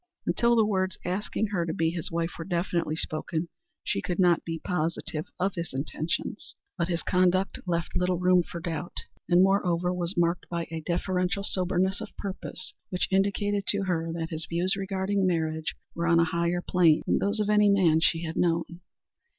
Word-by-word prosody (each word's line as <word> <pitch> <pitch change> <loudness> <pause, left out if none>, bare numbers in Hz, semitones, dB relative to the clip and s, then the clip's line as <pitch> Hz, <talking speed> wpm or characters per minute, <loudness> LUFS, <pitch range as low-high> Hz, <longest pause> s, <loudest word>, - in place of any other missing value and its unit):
Until 235 0 +3
the 225 -2 +5
words 190 -2 0
asking 200 +3 -1
her 190 -5 0
to 160 -1 -3
be 165 0 +1
his 170 -2 -4
wife 165 +1 -1
were - - -3
definitely 170 -2 -1
spoken 160 +1 -2 0.3
she 100 - -1
could 175 - -3
not 175 -3 +4
be 165 -1 -3
positive 160 -2 -2
of 190 +1 +1
his 170 -4 -5
intentions, 155 +7 -3 0.2
but 170 -2 -1
his 170 -2 -1
conduct 185 +1 +2
left 170 -2 -1
little 180 0 +1
room 180 0 +4
for 170 0 -7
doubt, 170 0 -4 0.3
and 175 +1 +6
moreover, 180 -2 +2
was 175 +1 -2
marked 170 0 +1
by 170 -1 -2
a 165 -1 -4
deferential 180 +3 -1
soberness 190 +1 0
of 220 - -9
purpose 185 -1 -5 0.2
which 180 - -1
indicated 200 +1 +1
to 200 -1 +2
her 165 -3 -1
that 165 0 -4
his 160 +1 -3
views 180 +4 +1
regarding 195 0 0
marriage 160 -2 -1 0.2
were 170 0 -2
on 170 0 +5
a - - +6
higher 170 +1 0
plane 170 -4 +4
than - - +2
those 205 +2 0
of 210 0 +1
any 210 -1 +5
man 180 -6 +4
she 165 0 +2
had 160 -1 -4
known. 170 -1 +2
175 Hz, 185 wpm, -27 LUFS, 170-190 Hz, 0.3 s, and